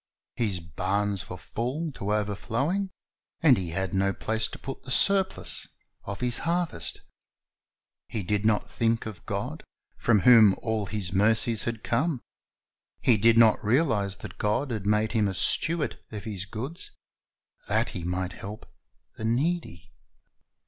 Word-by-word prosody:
His 105 Hz, -6 st, -1 dB
barns 95 Hz, +5 st, -2 dB
were -, -, -6 dB
full 140 Hz, +8 st, -3 dB
to 105 Hz, -6 st, -4 dB
overflowing, 115 Hz, -, -1 dB, 0.5 s
and 150 Hz, -6 st, +7 dB
he 90 Hz, -5 st, -3 dB
had 95 Hz, +4 st, -2 dB
no 100 Hz, 0 st, +2 dB
place 110 Hz, +2 st, -1 dB
to -, -, -9 dB
put 135 Hz, -, -7 dB
the -, -, -12 dB
surplus 190 Hz, +7 st, +2 dB, 0.4 s
of 100 Hz, -, -6 dB
his 125 Hz, -1 st, 0 dB
harvest. 170 Hz, -, -1 dB, 1.1 s
He 110 Hz, -, -4 dB
did 105 Hz, +2 st, 0 dB
not 110 Hz, -1 st, +1 dB
think 115 Hz, 0 st, 0 dB
of 110 Hz, -3 st, -8 dB
God, -, -, -3 dB, 0.4 s
from 110 Hz, -4 st, +3 dB
whom 110 Hz, -3 st, +7 dB
all 110 Hz, -3 st, -1 dB
his 95 Hz, -3 st, -3 dB
mercies 110 Hz, +2 st, +3 dB
had 115 Hz, -2 st, -3 dB
come. 155 Hz, -3 st, 0 dB, 0.8 s
He 120 Hz, -, +4 dB
did 115 Hz, +2 st, +4 dB
not 115 Hz, -2 st, +5 dB
realize 105 Hz, -, +1 dB
that 100 Hz, -2 st, -10 dB
God 105 Hz, +6 st, 0 dB
had 105 Hz, -3 st, -3 dB
made 105 Hz, +1 st, +2 dB
him 110 Hz, -3 st, +2 dB
a 95 Hz, -, -3 dB
steward 165 Hz, -, +1 dB
of 105 Hz, -3 st, -6 dB
His 100 Hz, -3 st, -4 dB
goods, 130 Hz, -, -5 dB, 0.8 s
that -, -, +1 dB
he 85 Hz, -, -6 dB
might 90 Hz, +1 st, -2 dB
help 105 Hz, +4 st, -8 dB, 0.5 s
the -, -, -7 dB
needy. 125 Hz, -, -1 dB
110 Hz, 150 wpm, -27 LUFS, 100-125 Hz, 1.1 s, and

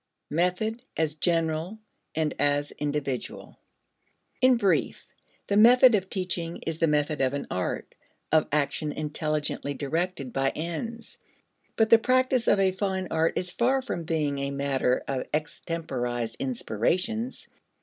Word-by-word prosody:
Method 180 Hz, +8 st, 0 dB, 0.2 s
as 160 Hz, -2 st, +1 dB
General 165 Hz, +3 st, 0 dB, 0.4 s
and 155 Hz, -1 st, 0 dB
as 145 Hz, 0 st, +1 dB
Individual. 145 Hz, -3 st, -3 dB, 0.8 s
In 255 Hz, -1 st, +6 dB
brief, 200 Hz, -5 st, +1 dB, 0.4 s
the 200 Hz, -, 0 dB
method 245 Hz, +3 st, +8 dB
of 190 Hz, -3 st, +1 dB
teaching 175 Hz, -3 st, -3 dB
is 165 Hz, 0 st, -3 dB
the 165 Hz, -, +3 dB
method 150 Hz, 0 st, +1 dB
of 135 Hz, +1 st, +1 dB
an 140 Hz, -, -3 dB
art, 90 Hz, 0 st, -3 dB, 0.4 s
of 155 Hz, 0 st, +4 dB
action 150 Hz, +1 st, 0 dB
intelligently 150 Hz, -1 st, -2 dB
directed 155 Hz, -1 st, -2 dB
by 135 Hz, 0 st, +2 dB
ends. 220 Hz, +9 st, -5 dB, 0.6 s
But 225 Hz, -1 st, +2 dB
the 230 Hz, -, +9 dB
practice 255 Hz, 0 st, +2 dB
of 205 Hz, -, +4 dB
a 190 Hz, -1 st, +4 dB
fine 190 Hz, -1 st, -2 dB
art 160 Hz, 0 st, +1 dB
is 180 Hz, -1 st, -2 dB
far 260 Hz, +7 st, +1 dB
from 175 Hz, -9 st, -4 dB
being 150 Hz, -3 st, -1 dB
a 140 Hz, 0 st, -1 dB
matter 140 Hz, -2 st, 0 dB
of 135 Hz, -2 st, -2 dB
extemporized 125 Hz, -7 st, -3 dB
inspirations. 180 Hz, -, -2 dB
160 Hz, 135 wpm, -27 LUFS, 145-195 Hz, 0.8 s, the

